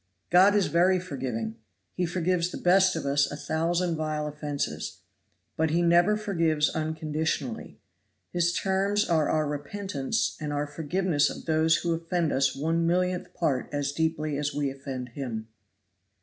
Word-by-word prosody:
God 190 +4 +6
is 205 -2 +3
very 180 +2 +3
forgiving 125 -10 -4 0.4
He 180 -1 -1
forgives 175 0 0
the - - -6
best 185 +1 +4
of 160 - -3
us 140 0 +2
a - - -5
thousand 170 +2 0
vile 155 -1 -2
offenses. 145 - -4 0.5
But 160 0 +1
He 170 +3 +2
never 175 +5 +4
forgives 165 -8 +1
unconditionally. 155 -5 -3 0.6
His 175 -1 +2
terms 195 +3 +1
are 160 -3 +2
our 155 -1 +2
repentance 150 - -2
and 150 -1 -3
our 145 0 -1
forgiveness 155 +1 0
of - - -8
those 160 0 +3
who 170 0 0
offend 165 0 -1
us 135 0 +2
one 165 +4 0
millionth 180 +1 0
part 140 -7 0
as 145 -1 -1
deeply 155 -1 -1
as 145 -1 -2
we 145 -2 0
offend 135 -2 -6
Him. 115 -4 -5
160 Hz, 150 wpm, -27 LUFS, 145-175 Hz, 0.6 s, God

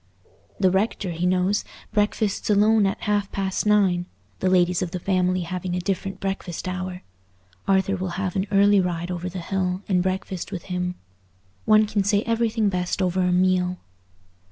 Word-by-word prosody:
The 190 -2 +4
rector, 195 -1 0
he 170 +2 -1
knows, 185 +3 +1 0.3
breakfasts 210 -1 0
alone 210 0 +4
at 195 - -3
half 205 -1 0
past 195 +1 -1
nine, 190 -4 +3 0.3
the 185 - +1
ladies 180 -1 +3
of 180 - -1
the 180 +1 -4
family 185 0 +1
having 180 +1 -3
a - - -1
different 195 +1 -3
breakfast 190 -3 -4
hour; 185 0 -4 0.6
Arthur 195 0 +2
will 185 -2 -4
have 190 -2 -2
an 190 +1 0
early 200 0 +5
ride 175 -1 -2
over 180 0 -3
the 185 - -7
hill 185 +1 -2
and 185 -3 +2
breakfast 185 0 -3
with 185 -4 -5
him. 180 -1 -3 0.7
One 215 0 +5
can 205 -1 0
say 205 +1 +2
everything 230 -1 +1
best 180 0 -1
over 185 0 +1
a 180 0 +2
meal. 180 0 +2
185 Hz, 170 wpm, -24 LUFS, 180-200 Hz, 0.7 s, early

